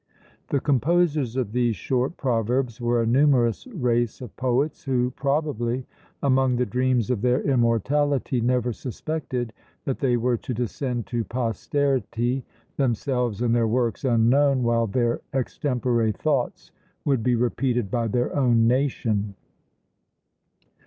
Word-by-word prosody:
The 140 - +1
composers 145 -2 +1
of 125 -6 -1
these 120 -1 +1
short 130 - -1
proverbs 125 0 -1
were 120 0 +2
a - - 0
numerous 125 - +3
race 120 - 0
of 125 -6 -9
poets, 130 +4 0
who, 125 -2 +1
probably, 130 -3 -1 0.4
among 130 -2 +3
the 125 +1 +1
dreams 125 +1 +1
of 115 -5 -1
their 125 +3 +2
immortality 130 +1 +1
never 125 0 +1
suspected 125 -2 -4 0.3
that 135 - -2
they 125 -3 +2
were 120 +1 +1
to 125 - -5
descend 120 0 -3
to 120 -2 -2
posterity, 125 +2 -1 0.3
themselves 125 -3 0
and 115 -1 +2
their 115 -1 +2
works 120 +2 0
unknown, 130 +2 +3
while 115 -1 +2
their 120 +3 0
extempore 125 -3 0
thoughts 135 +3 -2 0.3
would 135 -5 +2
be 125 +2 +2
repeated 120 -2 0
by 120 -2 0
their 120 +3 -1
own 120 -5 +3
nation. 115 -5 0
125 Hz, 130 wpm, -24 LUFS, 115-135 Hz, 0.4 s, numerous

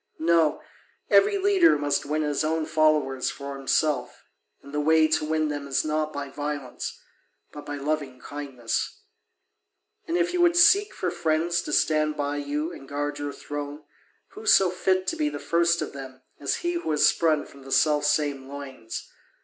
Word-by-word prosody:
No, 165 -2 +2 0.5
every 410 0 +5
leader 385 - +4
must 145 -1 -1
win 155 +1 0
his 150 0 0
own 160 0 0
followers 150 -5 +2
for 140 0 -7
himself, 135 -1 -1 0.4
and 140 - -13
the 150 - 0
way 160 +1 +4
to 155 0 +1
win 155 0 0
them 145 -1 -4
is 135 - 0
not 155 0 -1
by 145 -1 -5
violence 145 -2 -5 0.5
but 145 - -10
by 145 - -4
loving 145 -2 -3
kindness. 130 -5 -4 1.1
And 335 +1 0
if 355 0 +1
you 355 - +1
would 345 -1 +4
seek 395 +4 +5
for 180 - -2
friends 170 0 0
to - - -6
stand 155 -1 +2
by 145 0 -2
you 145 +3 -2
and 135 - -12
guard 145 0 -3
your 145 0 -3
throne, 145 +1 -7 0.5
who 435 +2 -11
so 190 - +6
fit 185 +1 +1
to 330 - -1
be 305 -2 0
the - - -6
first 170 -1 +1
of - - -7
them 130 -2 -10 0.2
as 140 - -1
he 345 - +1
who 340 - -2
is 150 - +5
sprung 155 -3 +2
from 140 - -15
the 135 0 -11
self 150 0 +3
same 145 -3 0
loins? 135 -5 -7
150 Hz, 180 wpm, -25 LUFS, 145-170 Hz, 1.1 s, so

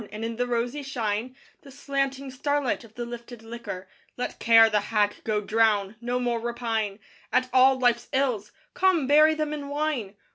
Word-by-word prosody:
and 215 +2 -5
in 230 0 -4
the 245 +2 -1
rosy 245 +4 -1
shine, 240 -2 -3 0.3
The 275 - -14
slanting 275 -1 -3
starlight 285 0 -1
of 225 0 -17
the 240 - -4
lifted 235 -1 -9
liquor, 225 -5 -7 0.3
Let 250 - -4
Care, 225 -1 +7
the 210 -1 +2
hag, 205 0 0
go 215 -1 0
drown! 210 -1 +2
No 245 +1 -1
more 240 -1 0
repine 225 -3 -2 0.3
At 255 0 +1
all 260 +1 +6
life's 240 -2 +1
ills! 250 -7 0 0.2
Come, 370 -6 +2
bury 305 +3 +5
them 305 -1 -2
in 290 -2 -5
wine! 285 -9 -2
240 Hz, 175 wpm, -26 LUFS, 225-270 Hz, 0.3 s, Care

